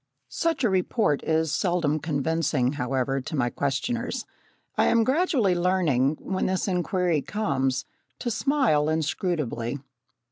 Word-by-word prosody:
Such 330 -4 -1
a 235 - +4
report 185 - +1
is 160 -1 0
seldom 170 -5 +1
convincing, 145 -3 0
however, 135 -1 -1
to 140 - -5
my 120 -4 +1
questioners. 235 - -2 0.5
I - - +3
am 230 -1 +4
gradually 260 - +2
learning, 170 -6 +2
when 190 -1 -2
this 185 +1 -1
inquiry 180 -3 +1
comes, 135 -10 -1 0.3
to 240 - -3
smile 230 - +2
inscrutably. 155 -6 -1
160 Hz, 120 wpm, -26 LUFS, 140-200 Hz, 0.5 s, a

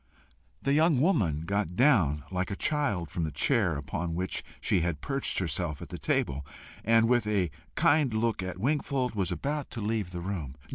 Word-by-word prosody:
The 140 - +2
young 155 -2 +4
woman 100 - +2
got 95 0 -1
down 95 - +4
like 90 0 -1
a 100 - -2
child 105 - 0
from 85 - -2
the 80 - -2
chair 90 - +2
upon 80 +4 -3
which 95 +2 -2 0.2
she - - +1
had 85 -3 -1
perched 135 - -2
herself 80 -3 -1
at - - -9
the - - -6
table, 70 +1 0 0.4
and 115 +1 +4
with 120 -3 +2
a 95 -6 +1 0.2
kind 145 -3 +4
look 110 -1 0
at 95 -1 -4
Wingfold, 130 +1 0
was 95 -4 -1
about 145 - -2
to - - -6
leave 105 -3 -1
the 90 -1 -6
room. 85 -8 -4
100 Hz, 185 wpm, -29 LUFS, 85-125 Hz, 0.4 s, young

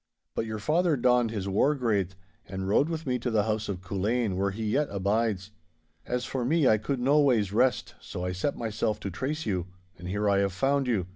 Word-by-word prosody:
But 115 - -2
your 110 0 -3
father 160 +7 +2
donned 125 -1 +3
his 100 -3 -3
war 110 +10 +2
graith 100 -8 0 0.3
and 95 +1 -4
rode 140 +10 +3
with 165 -1 -4
me 125 -2 0
to 120 - -2
the 110 -3 +2
house 110 -1 -2
of 95 -2 -3
Culzean, 100 +3 -1
where 100 +1 +1
he 105 +3 -5
yet 140 +8 +1
abides. 100 0 0 0.6
As 125 0 -1
for 130 -2 -2
me, 150 +3 +3
I 110 -2 +4
could 130 +5 -2
noways 125 -7 +3
rest, 125 +4 +2
so 90 - -5
I 90 - -1
set 95 +11 -2
myself 110 -1 -1
to 100 - -4
trace 145 - -3
you. 95 -5 -1 0.3
And 90 - -7
here 105 +3 -1
I 100 -1 +3
have 100 -1 +1
found 135 +5 +1
you. 105 -8 +1
110 Hz, 215 wpm, -28 LUFS, 100-130 Hz, 0.6 s, I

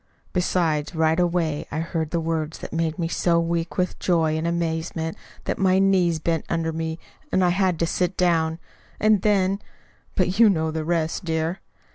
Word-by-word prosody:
Besides, 170 -3 0
right 160 +1 +2
away 170 -4 0
I 155 - -3
heard 160 -1 -2
words 160 -1 -1
that - - -8
made 165 0 -1
me 170 -2 -1
so 170 0 +2
weak 170 0 -2
with 180 -1 -1
joy 165 -3 +2
and 160 +1 -1
amazement 160 -1 -2 0.3
that - - -3
my 190 -1 +4
knees 190 -4 +3
bent 160 0 -1
under 165 -1 -1
me 160 0 -3 0.3
and 185 -1 +3
I - - +4
had 185 -1 +1
to 170 - +1
sit 180 +2 -1
down. 165 -3 +2 0.4
And 215 -2 +4
then 195 -2 +2 0.6
but 185 +2 0
you 230 -2 +8
know 160 -4 +1
the 160 0 -3
rest, 165 +2 -1
dear." 165 +1 -1
170 Hz, 175 wpm, -24 LUFS, 160-180 Hz, 0.6 s, you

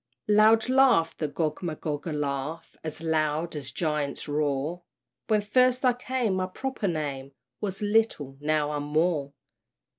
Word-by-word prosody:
Loud 215 +2 +5
laughed 255 -11 +4
the 155 - 0
Gogmagog, 155 0 -3
a - - -2
laugh 150 +2 -3
As 155 0 -5
loud 160 0 0
as 140 -2 -5
giant's 150 -4 -2
roar 150 +3 -1 0.5
"When 215 -2 +3
first 255 +4 +3
I 250 - +5
came, 245 -5 -1
my 185 0 0
proper 260 +2 -3
name 140 -5 -3 0.3
Was 200 0 -4
Little 205 -11 +1
now 150 0 +1
I'm 145 0 -4
_Moore! 155 -3 +1
160 Hz, 140 wpm, -27 LUFS, 150-210 Hz, 0.5 s, Loud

